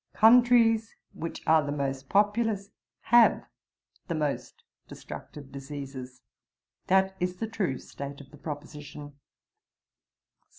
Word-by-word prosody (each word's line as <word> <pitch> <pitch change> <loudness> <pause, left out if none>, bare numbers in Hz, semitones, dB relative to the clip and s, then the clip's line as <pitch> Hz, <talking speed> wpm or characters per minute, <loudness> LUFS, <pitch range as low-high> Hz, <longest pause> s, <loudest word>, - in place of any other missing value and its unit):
'Countries 230 -1 +5 0.2
which 165 +1 -6
are 160 -1 +5
the 145 - -3
most 135 -2 -3
populous 205 0 +1 0.3
have 240 0 +5 0.6
the 170 - -2
most 150 -2 -3 0.2
destructive 140 -2 -10
diseases. 135 -2 -8 0.6
That 190 0 +3
is 180 0 -1
the 225 - -3
true 190 - -1
state 140 +2 -8
of 140 -2 -14
the 150 - -14
proposition.' 145 0 -8
155 Hz, 110 wpm, -28 LUFS, 140-210 Hz, 0.6 s, Countries